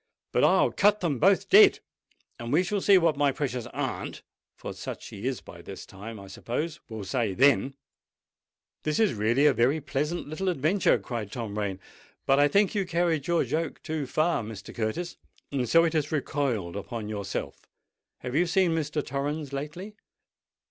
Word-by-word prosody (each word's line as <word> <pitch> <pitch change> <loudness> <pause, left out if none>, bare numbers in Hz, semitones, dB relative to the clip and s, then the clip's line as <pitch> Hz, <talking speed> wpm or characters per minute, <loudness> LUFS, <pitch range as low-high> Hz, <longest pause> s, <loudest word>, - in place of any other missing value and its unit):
But - - +2
I'll - - +4
cut 205 +1 +3
them 150 -8 0
both 195 +5 +4
dead; 405 0 +7 0.6
and 115 0 -5
we 170 +5 +4
shall 200 +1 -1
see 200 0 +6
what 165 -4 +2
my 145 -1 +3
precious 130 -4 -3
aunt—for - - -6
such - - -7
she 105 +6 -6
is 130 -2 -2
by - - -12
this - - -9
time, 105 +3 -9
I 100 - -10
suppose—will 120 - -5
say 110 -2 -1
then!" 135 +1 +3 1.1
"This 155 -1 -1
is 220 - +3
really 115 +6 +2
a 145 - +6
very 130 +6 +2
pleasant 150 +4 -2
little 170 +6 -2
adventure," 175 +4 +2
cried 110 -5 -5
Tom 110 -4 -5
Rain. 100 -3 -2 0.5
"But 135 +1 +4
I 145 - +6
think 200 +5 +2
you 205 -2 +1
carried 170 -4 0
your 170 -1 +2
joke 155 +5 -2
too 155 -3 -3
far, 160 +3 +1
Mr. 110 -2 -8
Curtis; 120 +11 -3 0.3
and 130 -4 -1
so 165 +6 +6
it 165 -1 +1
has 155 -2 0
recoiled 130 - -1
on 115 -3 -4
yourself. 100 -2 -5 0.5
Have 125 0 -5
you 170 +5 +2
seen 180 0 +2
Mr. 155 -2 -1
Torrens 140 +1 -3
lately?" 155 +9 -6
145 Hz, 170 wpm, -27 LUFS, 120-170 Hz, 1.1 s, dead